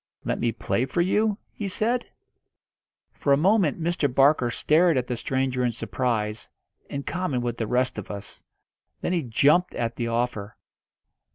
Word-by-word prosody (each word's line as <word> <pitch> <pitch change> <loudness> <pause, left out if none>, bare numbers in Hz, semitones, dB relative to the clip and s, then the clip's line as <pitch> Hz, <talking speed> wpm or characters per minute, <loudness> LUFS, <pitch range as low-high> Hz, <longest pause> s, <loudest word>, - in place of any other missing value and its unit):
"Let - - -1
me 120 - +1
play 120 +2 -1
for 170 - 0
you?" 210 +3 +2 0.2
he 205 - -4
said. 225 +5 0 1.1
For 140 - -1
a - - +5
moment 180 -1 +3
Mr. 165 -4 0
Barker 135 -1 +4
stared 155 +6 +3
at 125 - 0
the 125 - -3
stranger 130 +1 -1
in 120 - +2
surprise, 115 -2 -2 0.4
in 140 0 -4
common 165 -8 -2
with 120 -1 -3
the 110 - -2
rest 125 -1 0
of 100 - -9
us. 100 -1 -8 0.6
Then 175 - -1
he 175 - +1
jumped 150 +8 +3
at 115 0 -2
the 120 - -1
offer. 115 -3 -2
130 Hz, 165 wpm, -25 LUFS, 120-175 Hz, 1.1 s, a